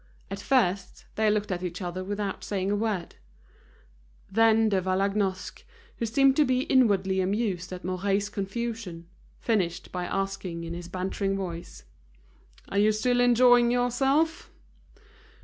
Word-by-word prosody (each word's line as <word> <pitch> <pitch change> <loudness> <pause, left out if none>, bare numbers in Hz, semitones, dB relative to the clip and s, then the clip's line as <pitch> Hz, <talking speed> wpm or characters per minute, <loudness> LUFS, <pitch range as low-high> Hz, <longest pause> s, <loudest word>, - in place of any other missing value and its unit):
At 195 - -4
first, 200 -6 0
they 220 0 +2
looked 210 -1 0
at 180 -1 -2
each 180 -1 -4
other 180 0 -4
without 200 0 -4
saying 195 -1 -2
a - - +2
word. 205 -5 -2 1.1
Then 225 +1 +4
De 195 -2 +1
Vallagnosc, 190 0 -1 0.3
who 230 - -2
seemed 270 +4 +4
to 305 - +6
be 255 -2 +1
inwardly 195 -8 +2
amused 190 -2 -1
at 180 -1 -7
Mouret's 195 +2 0
confusion, 205 -3 -5 0.3
finished 185 -6 -1
by 180 -1 -3
asking 195 -3 -3
in 165 0 -5
his 175 0 -7
bantering 195 +2 -2
voice: 175 -3 -6 0.9
"Are 200 - 0
you 210 +1 +4
still 245 +3 +1
enjoying 245 0 +5
yourself?" 270 +7 +1
200 Hz, 135 wpm, -27 LUFS, 185-230 Hz, 1.1 s, to